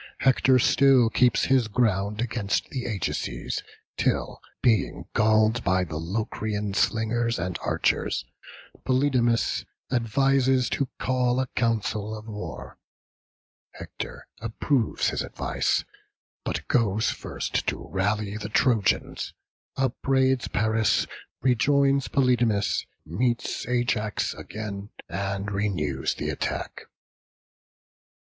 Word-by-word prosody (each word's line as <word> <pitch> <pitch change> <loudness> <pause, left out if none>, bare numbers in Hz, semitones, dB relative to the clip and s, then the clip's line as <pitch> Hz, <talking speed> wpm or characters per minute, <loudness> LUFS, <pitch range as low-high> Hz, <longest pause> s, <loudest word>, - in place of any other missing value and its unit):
Hector 130 0 +4
still 130 -2 +5
keeps 125 0 +3
his 130 -4 +3
ground 105 -2 +1
against 110 -4 -1
the 130 -2 -3
Ajaces, 105 -6 -3 0.4
till, - - 0 0.2
being 115 -6 +2
galled 110 +2 +3
by 95 0 +2
the 80 -3 -5
Locrian 105 +3 -2
slingers 115 +3 +1
and 90 -1 -3
archers, - - 0 0.6
Polydamas 130 -3 +2 0.3
advises 130 +2 +2
to 140 - 0
call 125 -1 +1
a 130 - +1
council 110 -2 0
of 110 +1 -11
war: 105 -1 -7 1.0
Hector - - -7 0.2
approves 115 +2 0
his - - -2
advice, - - -1 0.6
but - - -3
goes 110 -3 +2
first - - -3
to - - -2
rally 105 +2 -1
the 105 0 -5
Trojans; 110 -3 +1 0.4
upbraids 130 0 +1
Paris, 110 +2 +2 0.4
rejoins 140 +2 +3
Polydamas, 120 -6 +2 0.2
meets 120 +9 -1
Ajax 120 -4 0
again, 105 -1 -6 0.2
and 100 +1 -3
renews 85 -10 -1
the - - -2
attack. - - -4
110 Hz, 100 wpm, -26 LUFS, 105-125 Hz, 1.0 s, still